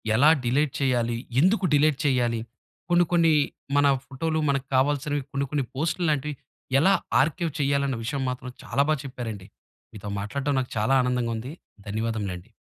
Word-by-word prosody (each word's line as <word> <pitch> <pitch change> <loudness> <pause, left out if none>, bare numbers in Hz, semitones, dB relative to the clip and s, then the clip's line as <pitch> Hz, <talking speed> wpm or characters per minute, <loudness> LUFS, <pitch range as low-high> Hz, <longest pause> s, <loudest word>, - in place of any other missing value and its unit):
ఎలా 140 +7 +6 0.2
డిలేట్ 135 +4 +1
చేయాలి? 120 -3 +1 0.2
ఎందుకు 190 +3 +3
డిలేట్ 145 -1 +3
చేయాలి? 120 -4 +2 0.5
కొన్ని, 175 0 +5
కొన్ని 165 -2 +4 0.4
మన 145 0 +5 0.2
ఫోటోలు 160 +4 -2
మనకు 140 -1 0
కావాల్సినవి 145 +2 +1
కొన్ని, 140 0 -1
కొన్ని 145 -3 0
పోస్టులు 160 +5 -1
లాంటివి 150 0 -1 0.4
ఎలా 190 +7 +5 0.3
ఆర్కైవ్ 160 +3 -1
చేయాలన్న 140 -1 +1
విషయం 135 +3 -2
మాత్రం, 125 0 -5
చాలా 125 +3 +1
బాగా 155 -3 +2
చెప్పారండి. 115 -7 -6 0.5
మీతో 105 -1 -7
మాట్లాడడం, 140 +8 -2
నాకు 125 - -7
చాలా 125 +6 +2
ఆనందంగా 125 -2 0
ఉంది. 125 +6 -6 0.4
ధన్యవాదములండి. 110 -3 -3
135 Hz, 145 wpm, -25 LUFS, 120-150 Hz, 0.5 s, ఎలా